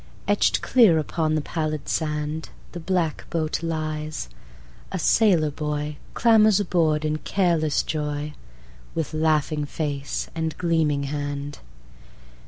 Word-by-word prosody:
Etched - - +2
clear 225 -10 +5
upon 155 0 0
the 155 - +1
pallid 155 -1 -3
sandThe 150 0 -2 0.3
black 175 -4 -1
boat 160 -1 -1
lies: 155 - -3 0.6
a - - -2
sailor 175 -9 +3
boyClambers 155 +9 +2
aboard 160 -5 +1
in 155 0 0
careless 165 -6 +1
joyWith 150 -1 -3 0.8
laughing 155 -1 +1
face 145 -2 -3
and 160 -1 -3
gleaming 160 -5 +1
hand. 145 0 -4
155 Hz, 100 wpm, -24 LUFS, 150-165 Hz, 0.8 s, clear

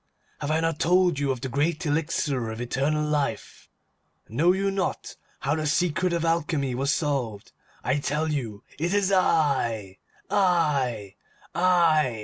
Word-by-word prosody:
Have 145 - -4
I 160 +1 +1
not 165 -1 -1
told 175 -2 +3
you 140 -1 0
of 130 -3 -4
the 135 - -3
great 150 +6 -1
elixir 145 -5 -1
of 110 0 -6
eternal 140 +5 0
life? 145 -7 -3 0.6
Know 150 +11 +3
you 195 +1 0
not 195 -1 -3 0.3
how 140 - 0
the 155 -1 -1
secret 180 +3 +1
of 170 -1 0
Alchemy 155 -5 0
was 135 +3 0
solved? 130 -11 -2 0.3
I 130 +3 +1
tell 150 +4 -1
you, 115 -8 -4 0.2
it 175 +5 0
is 200 -1 +2
I! 130 - +1 0.3
I! 140 - +1 0.4
I! 165 -9 +3
150 Hz, 145 wpm, -25 LUFS, 130-170 Hz, 0.6 s, told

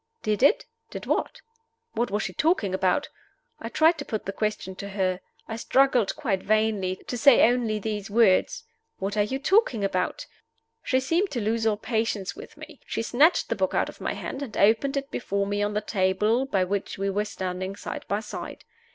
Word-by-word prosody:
Did 215 +1 0
it? 285 +10 +4 0.2
Did - - -7
what? - - -1 0.5
What 240 - 0
was 210 +2 -1
she - - -4
talking 305 - +1
about? 190 +9 +1 0.5
I 230 - -6
tried 320 +5 +3
to 285 - -5
put 215 - -4
the 195 - -4
question 210 -2 -2
to 200 - -6
her. 185 -2 -1 0.3
I 225 - -5
struggled 250 -3 +2
quite 215 -11 -1
vainly 215 -3 +1
to - - -4
say 275 +2 +7
only 235 -3 0
these 210 0 -4
words: 225 - +3 0.3
"What 195 +2 -3
are 210 - +3
you 210 +6 -1
talking 285 - +2
about?" 185 -2 -1 0.6
She 260 - +1
seemed 335 +9 +1
to 255 - -3
lose 225 +1 0
all 210 -1 +1
patience 220 -3 -2
with - - -12
me. - - -12
She - - -2
snatched 285 +9 +3
the - - 0
book - - -1
out - - +1
of - - -13
my - - -2
hand, 270 - -6
and 255 -6 -6
opened 230 +7 +3
it 275 +1 -4
before 200 -3 -1
me 205 +1 -1
on 205 0 -1
the 210 - +1
table 210 +5 +1
by 195 -7 +1
which 200 +2 -3
we 195 0 -1
were 205 +2 0
standing 185 -1 -4
side - - -6
by 205 +1 -1
side. - - -8
215 Hz, 200 wpm, -26 LUFS, 200-250 Hz, 0.6 s, say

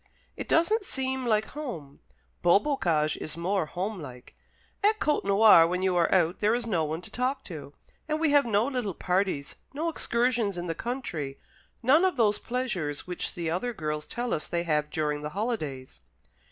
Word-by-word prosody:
It - - -7
doesn't 405 +7 +3
seem 265 -6 -2
like 215 -1 +2
home. 200 - -7 0.4
Beaubocage 175 - +2
is 155 +1 -7
more 180 0 0
home 190 +3 -4
like. 125 -3 -10 0.5
At 430 +1 +3
Côtenoir, 200 - +5
when 180 +1 -1
you 190 -1 +2
are 170 -1 +2
out, 175 -1 +2
there 215 +2 +3
is 240 -1 -2
no 180 -8 0
one 155 +2 -3
to - - -11
talk 255 +2 -1
to; 150 -5 -9 0.3
and 305 0 -1
we 320 -2 +2
have 285 -1 +6
no 220 -1 +2
little 245 -9 -2
parties, 180 -6 -1 0.2
no 325 +3 -1
excursions 235 - 0
into 175 0 -4
the - - 0
country, 165 - -4 0.5
none 285 +8 +5
of 370 -6 +2
those 210 -3 +3
pleasures 205 - -3
which 180 -1 -4
the 170 -2 -2
other 240 +8 -1
girls 150 -5 -4
tell 240 0 -2
us 155 - -2
they 170 0 -1
have 150 -3 0
during 150 -1 -1
the 150 - -4
holidays." 155 - -3
195 Hz, 180 wpm, -28 LUFS, 160-250 Hz, 0.5 s, have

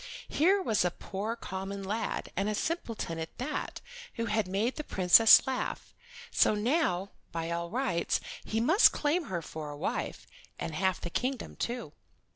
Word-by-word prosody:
Here 375 +7 +3
was 215 - +2
a 180 - +2
poor 205 +5 -4
common 195 -2 -5
lad, 210 +4 -3
and 195 +3 0
a 215 - -1
simpleton 230 - -3
at 160 - -6
that, 260 +5 -4 0.3
who 230 - -2
had 215 -2 0
made 205 +7 0
the 305 - -3
Princess 195 0 +7
laugh; 260 -1 -3 0.4
so - - +4
now, 210 - +1 0.2
by 165 0 -3
all 170 0 -2
rights, 200 -7 0 0.2
he 220 - -1
might 325 - +6
claim 310 +3 0
her 175 -7 -3
for 155 -1 -6
a 145 - -7
wife, - - -3 0.3
and 165 - -4
the 155 - -5
half 190 0 +1
of - - -19
the 170 - -4
kingdom, 255 +5 -2
too. 235 -10 -4
210 Hz, 175 wpm, -30 LUFS, 180-250 Hz, 0.4 s, Princess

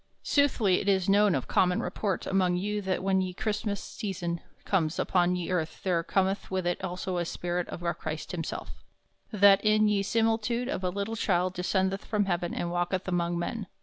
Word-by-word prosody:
Soothly 245 -10 +3
it 205 - -1
is 190 -2 +2
known 200 -2 +4
of 130 - -2
common 180 -1 +2
report 200 -3 -2
among 185 -2 +2
you 205 +3 -1
that 190 -1 -2
when 190 0 +2
ye 185 -1 -3
Chrystmass 210 0 -2
season 175 -5 -4 0.2
comes 170 -4 +1
upon 180 -1 +2
ye 180 0 -3
earth 165 -3 -2
there 180 -3 +1
cometh 195 +3 0
with 185 -1 -2
it 175 +1 -1
also 180 0 -3
the 175 - -1
spirit 175 +1 -3
of 175 - -7
our 170 0 0
Chryst 155 0 -5
himself, 165 -3 -6 0.5
that 200 -2 +6
in 215 0 +4
ye 205 -1 +2
similitude 225 +3 +1
of 265 -8 -3
a 180 - +1
little 200 +4 -3
childe 185 -4 +1
descendeth 190 +2 0
from 210 -2 0
heaven 175 -2 -1
and 170 - -3
walketh 175 +2 -1
among 175 -1 0
men. 195 +4 -3
190 Hz, 190 wpm, -28 LUFS, 175-205 Hz, 0.5 s, that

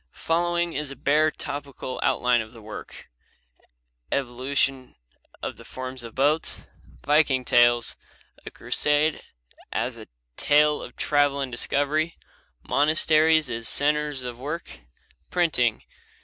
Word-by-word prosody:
Following 175 +1 +1
is 150 0 -3
a 140 - -7
bare 150 +4 +3
topical 140 -3 -6
outline 125 -1 +2
of 110 +1 -10
the 115 - -13
work: 105 0 -9 1.0
Evolution 130 0 -1 0.5
of - - -4
the - - -12
forms 130 0 -7
of 115 -2 -10
boats. 145 +4 0 0.4
Viking 145 -4 +3
tales. 120 -1 +3 0.5
A - - -7
crusade 150 +1 +1 0.5
as - - -2
a - - -11 0.3
tale 150 0 +3
of - - -10
travel 145 -1 +2
and 135 -2 -3
discovery. 145 +6 0 0.5
Monasteries 155 +1 +4
as 115 -1 -4
centers 150 -2 0
of 120 -1 -6
work. 145 - -6 0.5
Printing. 140 -10 +1
140 Hz, 120 wpm, -25 LUFS, 125-150 Hz, 1.0 s, Monasteries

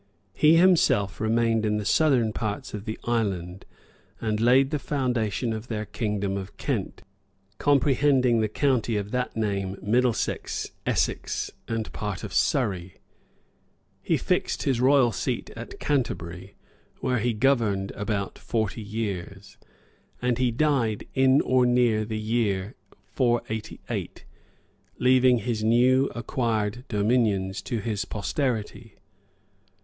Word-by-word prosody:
He 155 +9 +5
himself 150 - +3
remained 115 0 +2
in 105 -1 +1
the 105 - -4
southern 125 -8 +3
parts 105 -2 -4
of 105 0 -6
the 110 -1 -4
island, 95 -6 -2 0.5
and 110 -2 -1
laid 130 +4 +4
the 150 - -1
foundation 125 -5 -1
of 110 +2 -6
their 110 -3 -3
kingdom 100 -3 -2
of 95 +1 -8
Kent, 120 -10 -3 0.6
comprehending 135 -3 +3
the 110 - +1
county 120 -2 +1
of 100 0 -4
that 125 -2 -2
name 100 -3 -1
Middlesex, 120 +2 0 0.2
Essex, - - -1 0.2
and 115 -1 -3
part 105 -4 -4
of - - -6
Surrey. 90 -2 0 1.1
He - - +1
fixed - - -1
his 130 -3 +1
royal 130 -2 +5
seat - - -3
at - - -9
Canterbury, 95 - -2 0.5
where 125 -1 0
he 120 +2 0
governed 105 -6 +1
about 105 -2 -3
forty 110 -1 -2
years, 100 -2 -5 0.6
and 125 -1 0
he 125 -1 +3
died 120 -4 0
in 130 +1 +4
or 130 0 +3
near 120 -3 +3
the 110 0 -4
year 110 -2 -1 0.4
488, 120 -4 -2 0.7
leaving 130 -1 +4
his 115 -1 -2
new 125 +4 +4
acquired 115 -1 -2
dominions 100 -3 +1
to 115 - -3
his 105 -1 -2
posterity. 115 -1 -3
115 Hz, 125 wpm, -26 LUFS, 105-125 Hz, 1.1 s, He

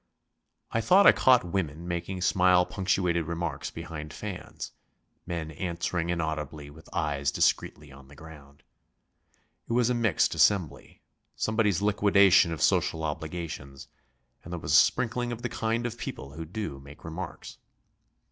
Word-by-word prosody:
I 115 - 0
thought 190 - +5
I - - +10
caught 130 -2 +4
women 85 -2 -3
making 90 +2 -4
smile 90 0 +4
punctuated 90 -2 0
remarks 85 -4 -3
behind 75 -2 -7
fans, 105 -4 -7 0.6
men 85 -3 -4
answering 85 +1 -3
inaudibly 80 -3 -3
with 80 +2 -16
eyes 75 -5 -1
discreetly 75 +1 0
on 70 0 -14
the 70 - -15
ground. 70 -2 -14 1.1
It - - -1
was 120 0 +3
a - - +2
mixed 115 -7 +2
assembly, 85 -9 +1 0.3
somebody's 105 -4 +1
liquidation 100 -3 +5
of 75 -4 -2
social 80 - +2
obligations, 80 -3 -6 0.5
and 85 - -10
there 90 - -4
was 75 - -2
a - - +7
sprinkling 120 +6 +3
of 120 0 -6
the 120 - -1
kind 115 +1 -1
of 120 0 -4
people 70 - -6
who 80 +3 -7
do 80 -5 -5
make 70 +2 -14
remarks. 85 +2 -7
85 Hz, 145 wpm, -28 LUFS, 75-100 Hz, 1.1 s, I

